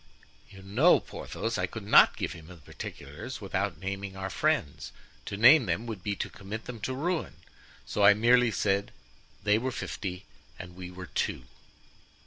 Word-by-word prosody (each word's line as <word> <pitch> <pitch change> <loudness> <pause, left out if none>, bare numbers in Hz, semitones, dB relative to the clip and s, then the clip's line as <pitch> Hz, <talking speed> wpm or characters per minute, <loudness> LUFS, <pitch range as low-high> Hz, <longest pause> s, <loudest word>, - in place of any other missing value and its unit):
"You 100 -1 -13
know, 120 - +4
Porthos, - - -5
I - - 0
could - - -8
not - - +6
give - - -3
him 80 -2 -12
the 90 - -11
particulars 75 - -8
without - - -2
naming 95 +2 -5
our 95 0 -4
friends; 70 -4 -1 0.4
to 100 - -4
name 120 +3 +7
them 90 +7 -1
would 110 -5 -6
be 100 +2 -2
to - - -3
commit 105 +3 -8
them 120 -2 -7
to 130 +4 -3
ruin, 165 +4 -2 0.5
so 105 - -1
I 100 +1 +8
merely 120 +2 +4
said 100 -2 0 0.5
they 105 +1 +3
were 130 +2 -2
fifty 100 -5 -5 0.3
and 90 -1 -10
we 90 -1 -8
were 90 0 -8
two. - - -2
100 Hz, 170 wpm, -29 LUFS, 95-115 Hz, 0.5 s, I